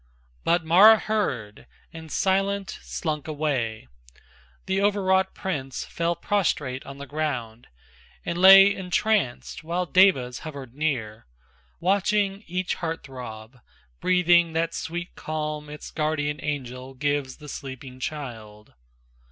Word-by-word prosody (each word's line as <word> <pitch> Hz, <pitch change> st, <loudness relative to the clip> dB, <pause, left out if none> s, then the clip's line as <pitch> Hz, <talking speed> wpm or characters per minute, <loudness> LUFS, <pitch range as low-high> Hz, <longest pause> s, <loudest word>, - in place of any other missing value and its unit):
But 170 Hz, -1 st, +2 dB
Mara 200 Hz, +7 st, +8 dB
heard, 135 Hz, -, -3 dB, 0.3 s
and 160 Hz, -2 st, -10 dB
silent 195 Hz, 0 st, 0 dB
slunk 155 Hz, -3 st, -4 dB
away, 135 Hz, -, -2 dB, 0.8 s
The 190 Hz, +1 st, 0 dB
o'erwrought 190 Hz, -2 st, +2 dB
prince 140 Hz, -10 st, -4 dB
fell 170 Hz, 0 st, -1 dB
prostrate 150 Hz, -8 st, -1 dB
on 140 Hz, 0 st, -8 dB
the 140 Hz, -, -7 dB
ground 130 Hz, -7 st, -4 dB, 0.6 s
And 170 Hz, -, -2 dB
lay 195 Hz, +2 st, +9 dB
entranced, 185 Hz, -, -1 dB
while 175 Hz, +3 st, -1 dB
devas 170 Hz, -10 st, +3 dB
hovered 140 Hz, -6 st, -8 dB
near, 120 Hz, -, -3 dB, 0.5 s
Watching 200 Hz, +2 st, +1 dB
each 180 Hz, +2 st, -2 dB
heart 165 Hz, -1 st, -4 dB
throb, 125 Hz, -2 st, -9 dB, 0.4 s
breathing 175 Hz, -2 st, +4 dB
that 165 Hz, +1 st, 0 dB
sweet 175 Hz, +2 st, -5 dB
calm 150 Hz, -1 st, -4 dB
Its 150 Hz, 0 st, -9 dB
guardian 150 Hz, -1 st, -1 dB
angel 130 Hz, -3 st, -5 dB
gives 145 Hz, -1 st, -1 dB
the 150 Hz, -, -12 dB
sleeping 130 Hz, -2 st, -8 dB
child. 115 Hz, -7 st, -7 dB
155 Hz, 115 wpm, -25 LUFS, 130-185 Hz, 0.8 s, lay